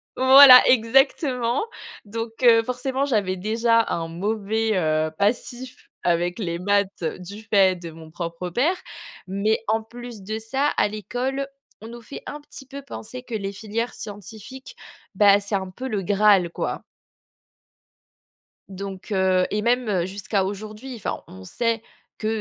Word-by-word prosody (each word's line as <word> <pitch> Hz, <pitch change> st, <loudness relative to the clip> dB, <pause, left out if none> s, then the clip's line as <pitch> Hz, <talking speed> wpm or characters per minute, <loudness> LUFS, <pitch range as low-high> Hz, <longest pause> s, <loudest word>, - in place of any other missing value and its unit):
Voilà, 260 Hz, 0 st, +10 dB
exactement. 255 Hz, -, +2 dB, 0.4 s
Donc, 225 Hz, +2 st, -5 dB
heu, 230 Hz, -2 st, +7 dB
forcément, 255 Hz, +3 st, -2 dB
j'avais 210 Hz, -9 st, 0 dB
déjà 230 Hz, +4 st, +2 dB
un 165 Hz, -1 st, -2 dB
mauvais, 215 Hz, +4 st, -1 dB
heu, 155 Hz, -2 st, +1 dB
passif 245 Hz, +4 st, -2 dB
avec 175 Hz, +2 st, 0 dB
les 170 Hz, -5 st, -3 dB
maths 200 Hz, 0 st, 0 dB
du 195 Hz, +4 st, -10 dB
fait 190 Hz, -3 st, +5 dB
de 170 Hz, -, -7 dB
mon 160 Hz, 0 st, -13 dB
propre 170 Hz, +1 st, -5 dB
père. 290 Hz, -, +1 dB, 0.5 s
Mais 200 Hz, +4 st, 0 dB
en 220 Hz, +1 st, +1 dB
plus 240 Hz, -1 st, -10 dB
de 215 Hz, +3 st, -4 dB
ça, 265 Hz, +6 st, -1 dB
à -, -, +3 dB
l'école, 245 Hz, +6 st, -3 dB, 0.3 s
on 220 Hz, -, -9 dB
nous 235 Hz, +1 st, -10 dB
fait, 275 Hz, -, -9 dB
un 295 Hz, -, -7 dB
petit 275 Hz, -2 st, -13 dB
peu, 280 Hz, +1 st, -9 dB
penser 255 Hz, -2 st, -8 dB
que 250 Hz, -, -10 dB
les 200 Hz, -2 st, -3 dB
filières 220 Hz, +4 st, -4 dB
scientifiques, 215 Hz, +6 st, -10 dB, 0.4 s
bah, 200 Hz, 0 st, +6 dB
c'est 200 Hz, 0 st, -3 dB
un 190 Hz, -1 st, -3 dB
peu 255 Hz, +8 st, -6 dB
le 210 Hz, -5 st, -2 dB
Graal 200 Hz, -2 st, +3 dB
quoi. -, -, -4 dB, 1.9 s
Donc, 195 Hz, +1 st, -8 dB
heu, 185 Hz, -1 st, +2 dB
et 210 Hz, -, -1 dB
même, 245 Hz, +1 st, +1 dB
heu, 180 Hz, -4 st, +1 dB
jusqu'à 195 Hz, +1 st, -2 dB
aujourd'hui, 215 Hz, +6 st, -6 dB
enfin 210 Hz, -, -4 dB
on 95 Hz, 0 st, -12 dB
sait 230 Hz, -, -1 dB, 0.4 s
que, 215 Hz, -, -3 dB
215 Hz, 150 wpm, -23 LUFS, 190-245 Hz, 1.9 s, Voilà